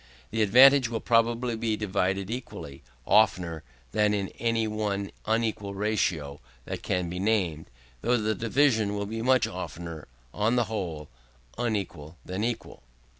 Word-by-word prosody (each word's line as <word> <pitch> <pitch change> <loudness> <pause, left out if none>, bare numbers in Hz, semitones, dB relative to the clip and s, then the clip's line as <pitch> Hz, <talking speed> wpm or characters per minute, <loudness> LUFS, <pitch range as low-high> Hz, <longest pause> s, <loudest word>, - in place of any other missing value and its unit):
The 110 0 0
advantage 130 +4 +7
will 115 -1 -2
probably 115 +1 +2
be 110 -1 -1
divided 95 -1 -1
equally, 115 - -7 0.2
oftener 90 -7 +3 0.3
than 105 - +2
in 100 -2 -2
any 115 -1 +1
one 105 -2 -2 0.2
unequal 110 -3 -1
ratio 90 -9 -1 0.2
that - - -5
can 90 -1 -1
be 90 +2 -5
named; 95 -7 0 0.3
though 120 +2 +2
the 110 -1 0
division 110 -1 +2
will 100 0 -2
be 115 +2 -4
much 130 +1 +4
oftener, 85 -3 -7 0.3
on 110 +3 +1
the 120 - +3
whole, 90 -9 -4 0.5
unequal 90 -9 -3
than 95 +3 -3
equal. 120 0 -4
105 Hz, 140 wpm, -27 LUFS, 95-115 Hz, 0.5 s, advantage